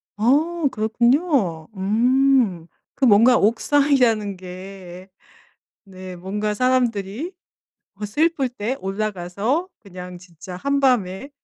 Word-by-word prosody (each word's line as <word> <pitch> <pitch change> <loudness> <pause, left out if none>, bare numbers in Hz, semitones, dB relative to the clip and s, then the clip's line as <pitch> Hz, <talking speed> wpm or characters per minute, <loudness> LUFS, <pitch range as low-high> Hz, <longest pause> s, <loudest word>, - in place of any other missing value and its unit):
아 300 +10 +1
그렇군요. 230 - +1
음 230 -2 +2 0.3
그 270 - +4
뭔가 230 +3 +6
옥상이라는 230 -3 +2
게 185 0 -10 0.8
네. 185 -1 -10
뭔가 205 +4 -3
사람들이 245 - -1 0.6
어 205 +2 -7
슬플 285 +5 0
때 245 +1 -4
올라가서 205 - -2
그냥 180 -3 -10
진짜 180 0 -11
한밤에 255 -3 0
215 Hz, 195 characters per minute, -21 LUFS, 190-260 Hz, 0.8 s, 뭔가